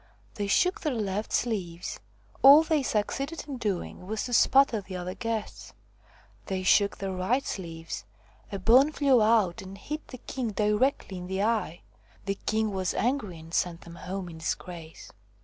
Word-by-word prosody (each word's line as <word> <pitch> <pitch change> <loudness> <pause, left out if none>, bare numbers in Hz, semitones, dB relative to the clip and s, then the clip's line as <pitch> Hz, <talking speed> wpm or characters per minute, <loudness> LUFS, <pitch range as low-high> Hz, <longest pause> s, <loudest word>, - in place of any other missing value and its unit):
They 205 -2 -3
shook 360 - +2
their 300 -5 -1
left 210 -1 -2
sleeves 185 -7 -2 0.4
all 285 +4 +9
they 315 -2 +1
succeeded 275 +7 -2
in 275 -3 -5
doing 195 -4 -3
was 215 +1 -2
to 245 - -5
spatter 245 -1 +5
the 190 -1 -8
other 180 0 -4
guests; 225 -1 -4 0.7
they 190 -2 -2
shook 200 +2 +4
their 195 -1 -3
right 190 +9 0
sleeves 165 - -6 0.5
a 200 - -3
bone 250 +9 +5
flew 275 -5 +3
out 215 -5 +3
and 190 +1 -9
hit 300 +8 -6
the 255 - -9
king 240 -2 -4
directly 210 -1 +1
in 180 - -7
the 190 +1 -1
eye. 215 -6 0 0.4
The 195 0 -2
king 220 0 +1
was 185 -1 -1
angry 230 -8 -1
and 160 +1 -13
sent 175 -1 0
them 170 - -12
home 180 +3 -5
in 165 -2 -9
disgrace. 165 0 -6
205 Hz, 165 wpm, -28 LUFS, 185-245 Hz, 0.7 s, all